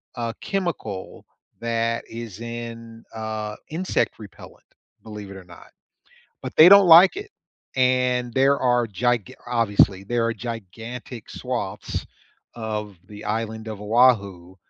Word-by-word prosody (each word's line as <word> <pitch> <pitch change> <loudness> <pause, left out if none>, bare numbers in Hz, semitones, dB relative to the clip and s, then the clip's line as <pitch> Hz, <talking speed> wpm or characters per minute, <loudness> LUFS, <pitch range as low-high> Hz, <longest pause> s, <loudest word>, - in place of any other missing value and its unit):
uh, 115 -2 -3
chemical 170 - -4 0.3
that 115 0 -1
is 115 -3 -8
in, 115 -1 -8
uh, 110 -1 -4
insect 170 -4 -1
repellent, 105 -2 -13 0.4
believe 105 -3 -9
it 95 - -9
or 95 - -11
not. 90 -1 -16 0.7
But, - - -7
they 160 +3 +9
don't 200 -1 +8
like 170 +3 +8
it, 405 +1 -7 0.4
and 125 -1 +1
there 135 +2 +3
are 120 -1 +2
giga 120 +1 -1
obviously, 105 -5 +2
there 115 +3 0
are 115 - 0
gigantic 115 +1 -8
swaths 120 -7 -4 0.5
of 105 -3 -5
the 105 +1 -11
island 110 +1 -3
of 105 -2 -6
Oahu 100 -6 +2
115 Hz, 125 wpm, -23 LUFS, 105-125 Hz, 0.7 s, they